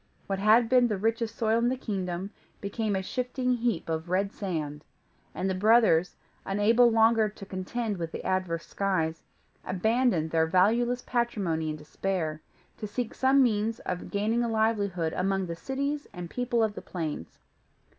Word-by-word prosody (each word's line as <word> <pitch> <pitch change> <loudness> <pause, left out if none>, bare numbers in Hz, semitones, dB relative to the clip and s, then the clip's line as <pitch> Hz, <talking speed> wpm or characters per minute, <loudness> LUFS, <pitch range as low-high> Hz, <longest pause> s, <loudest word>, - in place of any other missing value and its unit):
What 195 -1 -2
had 215 +4 +6
once 225 - -7
been 250 -1 +5
the 210 -3 -1
richest 225 +2 -1
soil 225 0 +2
in 240 +1 +2
the 260 - -1
kingdom, 190 -4 -3 0.3
became 205 +1 -2
a 190 - -1
shifting 250 +3 -1
heap 235 -7 -1
of 160 +1 -3
red 195 +2 0
sand; 155 -6 -4 0.5
and 185 - -1
the 190 - 0
brothers, 200 -4 +4 0.3
unable 225 +5 +4
longer 225 -1 +4
to 205 -1 -11
contend 200 +3 -3
with 165 -2 -4
the - - -7
adverse 185 -3 -1
skies, 165 -5 -1 0.4
abandoned 205 -4 +1
their 160 -1 +2
valueless 235 +8 +2
patrimony 195 -10 -1
in 155 - -3
despair, 155 +1 -3 0.4
to 210 - -4
seek 235 +2 -3
some 265 +1 +4
means 220 -1 +1
of 180 -1 -4
gaining 220 +4 0
a 235 - -1
livelihood 205 -7 0
among 195 +1 0
the 170 -1 -5
cities 280 - -3
and 175 -2 -7
people 245 -2 0
of 215 -1 0
the - - -7
plains. 155 - -5
205 Hz, 165 wpm, -28 LUFS, 180-230 Hz, 0.5 s, had